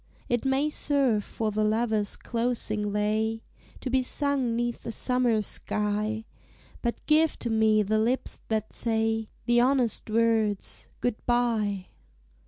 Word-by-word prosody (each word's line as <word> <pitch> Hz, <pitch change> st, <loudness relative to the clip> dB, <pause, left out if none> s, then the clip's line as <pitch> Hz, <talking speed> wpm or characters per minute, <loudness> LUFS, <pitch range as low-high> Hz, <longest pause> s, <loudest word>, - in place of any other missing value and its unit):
It 240 Hz, +1 st, 0 dB
may 270 Hz, +2 st, +2 dB
serve 270 Hz, -9 st, +1 dB
for 220 Hz, +1 st, -2 dB
the 215 Hz, +1 st, 0 dB
lover's 215 Hz, -1 st, +1 dB
closing 230 Hz, -3 st, -2 dB
lay, 220 Hz, +2 st, 0 dB, 0.4 s
To 255 Hz, -, -3 dB
be 260 Hz, 0 st, +3 dB
sung 265 Hz, -2 st, 0 dB
'neath 240 Hz, 0 st, -2 dB
a -, -, -2 dB
summer 245 Hz, -1 st, +2 dB
sky; 210 Hz, +2 st, -2 dB, 0.6 s
But 235 Hz, -1 st, -3 dB
give 315 Hz, +1 st, +3 dB
to 235 Hz, -, -3 dB
me 220 Hz, -1 st, +4 dB
the 215 Hz, +2 st, +1 dB
lips 240 Hz, +4 st, -1 dB
that 220 Hz, -1 st, -2 dB
say 225 Hz, -1 st, 0 dB, 0.2 s
The 240 Hz, 0 st, +4 dB
honest 250 Hz, -4 st, +1 dB
words, 220 Hz, -2 st, +1 dB
"Good 245 Hz, -3 st, -1 dB
bye!" 220 Hz, -6 st, +1 dB
225 Hz, 135 wpm, -27 LUFS, 215-245 Hz, 0.6 s, me